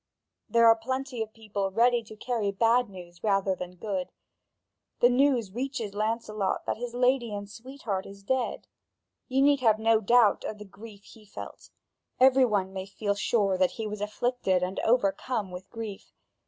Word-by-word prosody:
There 230 0 +4
are 225 0 +8
plenty 260 +1 -4
of 220 -1 -4
people 210 -3 -3
ready 235 +4 +3
to 215 - -11
carry 220 -2 -2
bad 230 +3 +2
news 175 -3 -12
rather 195 -2 +2
than 180 -1 -7
good. 190 -1 -4 0.9
The 245 - +6
news 250 -5 +2
reaches 245 -2 -4
Lancelot 215 -1 -2
that - - -2
his 240 +1 -6
lady 250 -2 +2
and 205 0 -6
sweetheart 225 -3 -5
is 200 0 -12
dead. 260 +4 -1 0.6
You 270 +1 +2
need 285 0 +4
have 220 -4 +4
no 225 0 +3
doubt 225 0 +4
of 215 - -5
the 210 - -10
grief 205 +1 -13
he 220 +1 -16
felt; 205 - -10 0.5
every 260 0 +6
one 195 -4 -1
may 190 0 -5
feel 200 +1 -2
sure 200 -2 +1
that 185 -1 +2
he 225 - -3
was 210 -1 -5
afflicted 210 -3 0
and 185 +1 -3
overcome 220 -2 0
with 180 +2 -9
grief. 220 -3 -7
220 Hz, 170 wpm, -28 LUFS, 195-245 Hz, 0.9 s, are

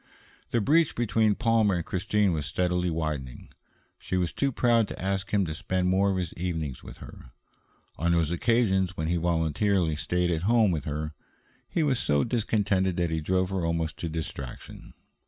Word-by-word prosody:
The 120 - +1
breach 155 +8 +3
between 110 -2 +2
Palmer 115 -4 +2
and 85 - -3
Christine 95 +1 +1
was 75 -2 -2
steadily 90 +2 0
widening. 75 -6 -4 0.5
She 95 - -3
was 90 -2 -1
too 140 -1 0
proud 115 -3 +3
to - - -8
ask 95 +1 -2
him 100 -2 +2
to 80 - -3
spend 90 +3 -1
more 95 +2 +3
of 95 - 0
his 90 -3 -3
evenings 80 -7 -4
with - - -11
her. - - -12 0.7
On 85 +2 +1
those 85 -2 +1
occasions 95 -2 +1
when 80 0 -2
he 85 - +1
voluntarily 85 +1 +1
stayed 90 +3 0
at 80 -1 -1
home 110 +1 +3
with 75 -5 -2
her, 75 +1 -3 0.6
he 165 - 0
was 135 -5 +1
so 70 -8 +2
discontented 105 -6 0
that 85 -2 0
he 80 -1 -1
drove 95 +3 0
her 95 -2 -1
almost 85 -1 -1
to 85 - -4
distraction. 75 -5 -7
90 Hz, 180 wpm, -27 LUFS, 80-105 Hz, 0.7 s, breach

